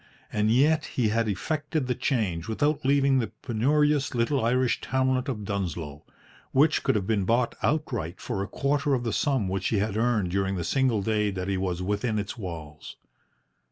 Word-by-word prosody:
And 105 0 +2
yet 145 +6 +3
he 115 -4 0
had 115 +1 +1
effected 150 - -2
the 125 - 0
change 100 - -1
without 145 +7 0
leaving 135 0 +3
the 115 - -1 0.2
penurious 145 +4 +1
little 120 +2 +1
Irish 125 +2 +1
townlet 130 +1 0
of 105 -6 -4
Dunsloe, 85 -7 -4 0.5
which 150 +4 +4
could - - +1
have 100 -3 0
been 105 -1 +1
bought 115 +5 +1
outright 120 - -1
for 110 -6 -3
a 100 - -3
quarter 140 +2 0
of 120 - -2
the 115 - -2
sum 135 -9 +1
which 95 0 -1
he 110 - +1
had 105 +1 -1
earned 110 -6 +1
during 95 +1 0
the 85 - -2
single 125 - +1
day 105 0 +1
that 95 -2 -4
he 100 - 0
was 90 -1 -2
within 105 +3 -1
its 105 -1 -3
walls. 80 -8 -8
115 Hz, 185 wpm, -27 LUFS, 100-135 Hz, 0.5 s, which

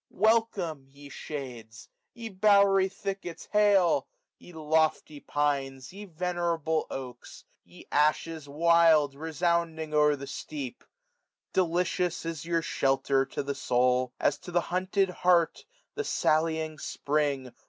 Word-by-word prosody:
WfiLCOM£, 200 -10 +1
ye 140 +1 -13
shades! 125 -7 -8 0.3
ye 235 -1 -7
bowery 200 -1 +4
thickets 195 -3 -6
hail! 205 -4 +3 0.3
Ye - - -14
lofty 155 -1 0
fiats! 135 -2 -1
ye 205 +2 -9
venerable 170 -3 -2
oaks! 125 -2 -9 0.2
470 - - -20
Ye - - -14
ashes 150 0 0
wild, 160 -1 +4
resounding 160 +1 -1
o'er 150 -1 +4
the 140 0 -8
steq)! 140 -1 -6 0.8
Delicious 180 -1 0
is 165 -3 -4
your 165 -1 0
shelter 135 -1 +1
to - - -4
the 140 0 -3
soul. 125 -1 +1
As 145 - +1
to - - -11
the 175 0 +2
hunted 185 +1 +1
hart 175 -2 +2 0.3
the 435 - -3
sallying 160 - 0
spring. 140 -4 -2
160 Hz, 120 wpm, -28 LUFS, 140-180 Hz, 0.8 s, bowery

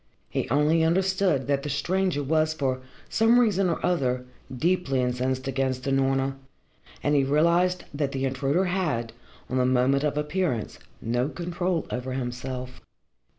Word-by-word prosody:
He - - -2
only 150 +5 +3
understood 185 -4 +2
that 140 -1 +1
the 150 - -5
stranger 175 +2 0
was 155 +2 +1
for 130 -4 -1 0.3
some 230 +2 +4
reason 195 -6 +3
or 165 - -1
other 130 -7 0 0.3
deeply 145 0 0
incensed 130 +1 -1
against 130 -1 -1
Unorna, 135 0 +1 0.7
and 145 - +2
he 140 -2 +4
realised 170 +6 +2
that 145 -1 -1
the 135 -1 -2
intruder 135 +7 +1
had, 155 -12 -1 0.3
on 130 - -2
the 125 - +3
moment 130 +2 +2
of 150 -1 0
appearance, 150 - -1 0.2
no 120 +4 0
control 175 0 -2
over 125 +1 -3
himself. 125 0 -5
140 Hz, 145 wpm, -26 LUFS, 130-170 Hz, 0.7 s, some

